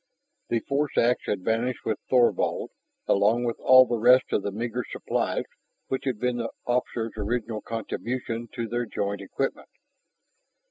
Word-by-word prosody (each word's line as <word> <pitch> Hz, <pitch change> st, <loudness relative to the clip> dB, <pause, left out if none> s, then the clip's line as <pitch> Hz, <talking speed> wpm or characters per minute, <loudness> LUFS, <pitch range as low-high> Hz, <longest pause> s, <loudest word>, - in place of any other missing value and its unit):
The 115 Hz, -, +1 dB
force 140 Hz, +1 st, -1 dB
ax 120 Hz, +1 st, +2 dB
had 100 Hz, -3 st, -1 dB
vanished 115 Hz, +4 st, -1 dB
with 110 Hz, -, -1 dB
Thorvald, 125 Hz, -2 st, +2 dB, 0.3 s
along 105 Hz, +5 st, +3 dB
with 120 Hz, -1 st, -2 dB
all 130 Hz, 0 st, +8 dB
the 120 Hz, -2 st, -1 dB
rest 125 Hz, +3 st, +5 dB
of -, -, +2 dB
the 100 Hz, -, -3 dB
meager 120 Hz, +4 st, -3 dB
supplies -, -, -1 dB, 0.5 s
which 130 Hz, +1 st, -2 dB
had 130 Hz, -5 st, 0 dB
been 125 Hz, +2 st, 0 dB
the 115 Hz, -1 st, -2 dB, 0.2 s
officer's 120 Hz, -2 st, -1 dB
original 110 Hz, +1 st, -2 dB
contribution 115 Hz, +1 st, -4 dB
to 115 Hz, -1 st, -2 dB
their 120 Hz, +1 st, -2 dB
joint 100 Hz, -1 st, -3 dB
equipment. 135 Hz, +7 st, -3 dB
120 Hz, 150 wpm, -26 LUFS, 110-125 Hz, 0.5 s, all